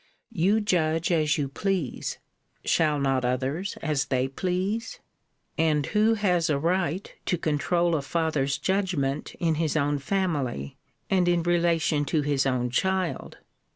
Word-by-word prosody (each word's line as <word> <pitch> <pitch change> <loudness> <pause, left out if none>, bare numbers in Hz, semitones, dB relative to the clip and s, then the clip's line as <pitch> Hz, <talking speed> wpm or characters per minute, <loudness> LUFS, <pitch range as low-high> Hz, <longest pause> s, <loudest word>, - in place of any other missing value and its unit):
You 205 +2 +2
judge 165 -4 +1
as 155 -2 +2
you 145 -2 -1
please. 180 0 -2 0.5
Shall 155 -2 +2
not 135 -2 +1
others 130 +9 -2
as 150 -4 0
they 130 -1 0
please? 190 - -2 0.6
And 155 -3 +2
who 220 +1 +3
has 180 -6 +1
a 145 - +2
right 175 +3 -1
to 180 - +1
controul 170 +3 +1
a 155 - +1
father's 145 -2 0
judgment 175 -8 -1
in 165 -2 0
his 160 -1 0
own 145 -1 +1
family, 140 - -2 0.4
and 185 -2 +3
in 175 -1 +2
relation 170 -3 +2
to 150 +2 0
his 140 -1 +1
own 125 -2 0
child? 190 +5 -1
160 Hz, 140 wpm, -26 LUFS, 140-180 Hz, 0.6 s, who